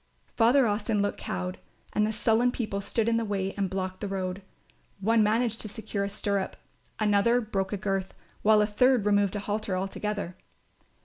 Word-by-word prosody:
Father 245 Hz, +3 st, +5 dB
Austin 210 Hz, -1 st, +1 dB
looked 205 Hz, -, -2 dB
cowed, 180 Hz, 0 st, -4 dB, 0.3 s
and 210 Hz, 0 st, +2 dB
the -, -, -1 dB
sullen 225 Hz, +3 st, +2 dB
people 215 Hz, -5 st, -3 dB
stood 215 Hz, +3 st, -1 dB
in 230 Hz, 0 st, +3 dB
the 230 Hz, -, 0 dB
way 195 Hz, -2 st, -2 dB
and 195 Hz, -2 st, -1 dB
blocked 185 Hz, 0 st, -4 dB
the 205 Hz, -, -2 dB
road. 190 Hz, -1 st, -3 dB, 0.6 s
One 225 Hz, +3 st, +3 dB
managed 225 Hz, +2 st, +2 dB
to -, -, -3 dB
secure 215 Hz, -2 st, -4 dB
a 200 Hz, -, -2 dB
stirrup, 200 Hz, -1 st, -2 dB, 0.4 s
another 215 Hz, +3 st, +3 dB
broke 195 Hz, -4 st, -2 dB
a 205 Hz, -, -1 dB
girth, 195 Hz, -1 st, -2 dB, 0.3 s
while 215 Hz, 0 st, +5 dB
a -, -, +3 dB
third 235 Hz, +2 st, +3 dB
removed 205 Hz, -1 st, +2 dB
a -, -, -1 dB
halter 205 Hz, -2 st, -2 dB
altogether. 195 Hz, -1 st, -3 dB
205 Hz, 180 wpm, -28 LUFS, 195-220 Hz, 0.6 s, Father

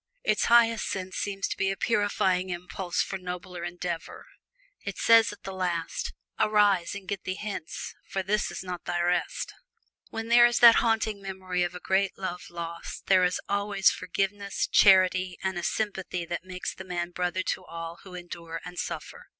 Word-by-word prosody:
Its 215 Hz, -, +2 dB
highest 230 Hz, -2 st, +4 dB
use 185 Hz, -1 st, -5 dB
seems 200 Hz, -1 st, -2 dB
to -, -, -3 dB
be 195 Hz, -, 0 dB
a 195 Hz, -, -2 dB
purifying 190 Hz, -4 st, +1 dB
impulse 180 Hz, 0 st, -2 dB
for 195 Hz, -, -5 dB
nobler 180 Hz, -1 st, -6 dB
endeavor. 175 Hz, -1 st, -5 dB, 0.6 s
It -, -, -5 dB
says 230 Hz, -1 st, +6 dB
at 205 Hz, -, -13 dB
the 195 Hz, -, -5 dB
last, 175 Hz, -3 st, -2 dB, 0.3 s
"Arise, 205 Hz, -4 st, +3 dB
and 195 Hz, -2 st, -8 dB
get 200 Hz, -2 st, -3 dB
thee 185 Hz, -, -3 dB
hence, 200 Hz, -6 st, -5 dB, 0.2 s
for 195 Hz, -, -2 dB
this 210 Hz, +3 st, 0 dB
is -, -, -6 dB
not 180 Hz, -2 st, -6 dB
thy 175 Hz, 0 st, -1 dB
rest." 175 Hz, 0 st, 0 dB, 0.6 s
Where 225 Hz, -, -4 dB
there 240 Hz, +1 st, +7 dB
is 240 Hz, -, 0 dB
this 235 Hz, -1 st, +9 dB
haunting 220 Hz, -3 st, +1 dB
memory 185 Hz, -2 st, -3 dB
of 175 Hz, 0 st, -1 dB
a -, -, -5 dB
great 190 Hz, +1 st, +1 dB
love 180 Hz, -2 st, -4 dB
lost 170 Hz, -1 st, -7 dB
there 185 Hz, -1 st, +5 dB
is 180 Hz, 0 st, +1 dB
always 200 Hz, -1 st, +2 dB
forgiveness, 195 Hz, +2 st, -2 dB
charity, 185 Hz, -2 st, +5 dB
and 190 Hz, -1 st, -1 dB
a -, -, -4 dB
sympathy 190 Hz, -4 st, -2 dB
that 170 Hz, +1 st, -4 dB
makes 185 Hz, 0 st, -5 dB
the 190 Hz, -, -9 dB
man 175 Hz, -1 st, -3 dB
brother 180 Hz, +1 st, -1 dB
to -, -, -2 dB
all 165 Hz, 0 st, -7 dB
who 185 Hz, 0 st, -12 dB
endure 170 Hz, -2 st, -7 dB
and 180 Hz, 0 st, -7 dB
suffer. -, -, -6 dB
185 Hz, 180 wpm, -28 LUFS, 175-200 Hz, 0.6 s, this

